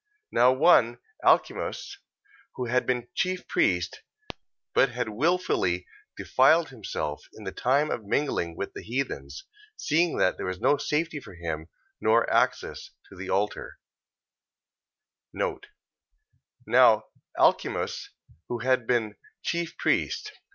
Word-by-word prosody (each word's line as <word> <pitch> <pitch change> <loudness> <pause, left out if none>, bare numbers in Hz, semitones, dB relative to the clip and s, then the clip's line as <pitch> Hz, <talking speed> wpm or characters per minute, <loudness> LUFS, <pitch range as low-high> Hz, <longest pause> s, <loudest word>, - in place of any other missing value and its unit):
Now 125 - +5
one 130 -4 +4 0.3
Alcimus, - - +1 0.6
who 125 - -3
had 125 +2 0
been 125 -1 0
chief 185 0 -1
priest, 90 -1 +1 0.7
but 135 - +4
had 120 -2 -3
wilfully 115 - 0 0.3
defiled 155 +5 +4
himself 95 - -5
in - - -11
the - - -4
time 140 +4 +1
of 115 - -3
mingling 100 - -1
with 100 - -4
the - - -7
heathens, 135 - -4 0.3
seeing 165 +2 +1
that 95 - +2
there - - -4
was 95 0 -4
no 145 - +3
safety 150 +1 -1
for 95 - -13
him, 80 -2 -5 0.3
nor - - +3
access 390 - 0 0.2
to - - -11
the - - -7
altar, - - -2 1.6
Now 425 0 0 0.3
Alcimus, 405 - +1 0.4
who 120 - -3
had 125 0 +1
been 110 -4 0 0.3
chief 170 -1 -2
priest... 425 - 0
130 Hz, 120 wpm, -27 LUFS, 110-170 Hz, 1.6 s, Now